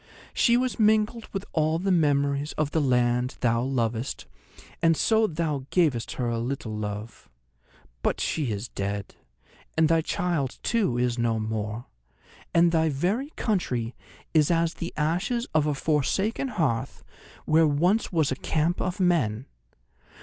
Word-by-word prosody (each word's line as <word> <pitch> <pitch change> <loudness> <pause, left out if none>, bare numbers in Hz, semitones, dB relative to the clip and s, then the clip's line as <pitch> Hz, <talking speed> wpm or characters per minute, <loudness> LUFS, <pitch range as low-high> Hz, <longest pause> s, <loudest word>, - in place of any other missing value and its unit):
She 235 -1 +4
was 255 -1 -1
mingled 215 +1 +2
with 195 0 -4
all 155 0 +2
the 190 +3 0
memories 145 -3 +1
of 150 -1 -1
the 160 - +1
land 125 -1 +1
thou 115 -1 +2
lovest, 120 -1 -2 0.6
and 165 -1 +4
so 220 -1 +3
thou 150 -5 -2
gavest 150 -11 +1
her 125 - -2
a 115 -1 -1
little 120 -2 -3
love. 105 +1 -6 0.7
But - - 0
she 145 -7 -1
is 105 +3 -4
dead; 100 -1 -4 0.6
and 160 0 +5
thy 165 -1 +4
child 160 -5 -1
too 205 - +1
is 120 0 0
no 115 -1 +1
more; 110 +1 -3 0.7
and 170 0 +4
thy 160 -1 +2
very 190 - -1
country 125 - -1 0.4
is 155 -3 +4
as 165 -1 +2
the 170 - -5
ashes 185 +11 0
of 155 -1 +3
a 150 - 0
forsaken 165 - 0
hearth 160 - -2 0.4
where 160 +1 +4
once 175 +9 +1
was 160 -6 +1
a - - 0
camp 160 +6 0
of 185 +2 -2
men. 135 - +1
150 Hz, 150 wpm, -26 LUFS, 120-175 Hz, 0.7 s, and